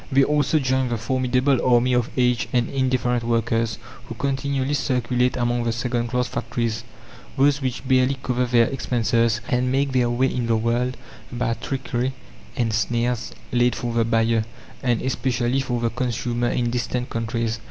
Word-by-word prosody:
They 135 +1 +5
also 150 +1 +2
join 130 -2 +1
the 120 - -1
formidable 130 +2 +1
army 125 0 +3
of 125 -1 +1
aged 125 -1 +2
and 120 -2 +2
indifferent 130 -3 0
workers 115 -1 0 0.3
who - - -7
continually 140 0 -1
circulate 125 -2 +1
among 120 0 0
the 115 - 0
second 120 +1 -1
class 125 +1 0
factories 115 -1 -2 0.5
those 145 +1 +3
which 130 0 -3
barely 130 +1 +3
cover 125 0 0
their 120 -1 +4
expenses 115 -2 +1
and 125 +1 +1
make 140 +1 +1
their 125 -2 +2
way 120 +2 +2
in 120 -2 -1
the 115 - +3
world 120 +3 0 0.3
by 125 -1 -1
trickery 130 0 -3 0.4
and 115 -2 0
snares 120 +1 0 0.2
laid 120 0 +2
for 120 -2 -3
the 115 0 +2
buyer, 115 0 +2 0.4
and 120 -3 0
especially 125 0 0
for 125 -2 -1
the 115 -1 0
consumer 120 0 -1
in 120 -1 0
distant 125 +1 -2
countries. 115 -1 -2
125 Hz, 165 wpm, -23 LUFS, 115-130 Hz, 0.5 s, They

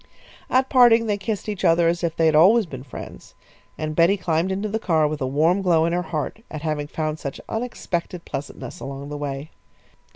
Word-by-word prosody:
At 260 +1 +3
parting 240 -3 +6
they 205 -2 -1
kissed 210 0 -3
each 205 -3 -4
other 165 0 +4
as 170 +1 0
if 165 -1 -1
they 165 - +2
had 160 - +4
always 200 +9 +6
been 130 -7 -8
friends, 130 -2 -10 0.4
and 155 0 -3
Betty 175 +5 +4
climbed 175 0 0
into 200 +3 -2
the 220 +2 -2
car 160 -7 +2
with 150 -1 -4
a 130 - 0
warm 160 +8 +2
glow 170 -4 +3
in 170 - 0
her 175 - +1
heart 165 +3 -4
at 155 -1 -7
having 150 -2 -2
found 155 0 -3
such 140 - -6
unexpected 185 -7 -4
pleasantness 145 +5 -7
along 140 +1 -7
the 150 - -5
way. 145 +1 -5
165 Hz, 205 wpm, -23 LUFS, 150-200 Hz, 0.4 s, parting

